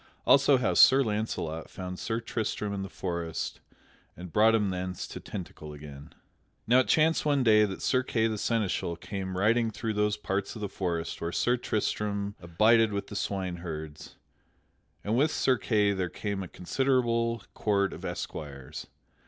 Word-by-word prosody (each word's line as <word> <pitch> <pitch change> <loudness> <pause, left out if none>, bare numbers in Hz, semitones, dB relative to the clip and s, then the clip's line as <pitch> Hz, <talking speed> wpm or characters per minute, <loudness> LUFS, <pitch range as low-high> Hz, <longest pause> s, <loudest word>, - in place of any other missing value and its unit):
Also 140 0 +6
how 125 - +1
Sir 135 +1 +7
Launcelot 105 -8 -3
found 90 -1 -6
Sir 115 0 -2
Tristram 110 -3 -3
in 100 - -3
the 95 - -5
forest 85 -4 -4 0.6
and 90 -1 -9
brought 110 +1 +5
him 105 -3 +1
thence 90 0 -4
to - - -8
Tintagel 75 -5 -8
again._ 70 -1 -11 0.5
Now 125 +3 +5
it 130 - +2
chanced 160 +1 +3
one 145 -3 +2
day 110 -2 +6
that 95 -2 -6
Sir 130 - +3
Kay 115 -3 0
the 110 -2 -1
Seneschal 105 -7 0
came 95 +1 -5
riding 115 +4 +3
through 110 +1 -3
those 105 0 +1
parts 100 0 -3
of 110 - -7
the 105 - -1
forest 85 -4 -3
where 85 - -2
Sir 120 +7 +2
Tristram 105 -3 -2
abided 110 +6 +4
with 100 -1 -3
the 105 - -7
swineherds, 85 -6 -4 0.9
and 105 +2 0
with 145 +6 +3
Sir 130 -4 +1
Kay 105 -3 +2
there 95 -2 -2
came 100 0 -4
a 95 - -5
considerable 115 +3 0
court 100 -2 +1
of - - -10
esquires. 70 -4 -6
105 Hz, 165 wpm, -29 LUFS, 90-115 Hz, 0.9 s, Sir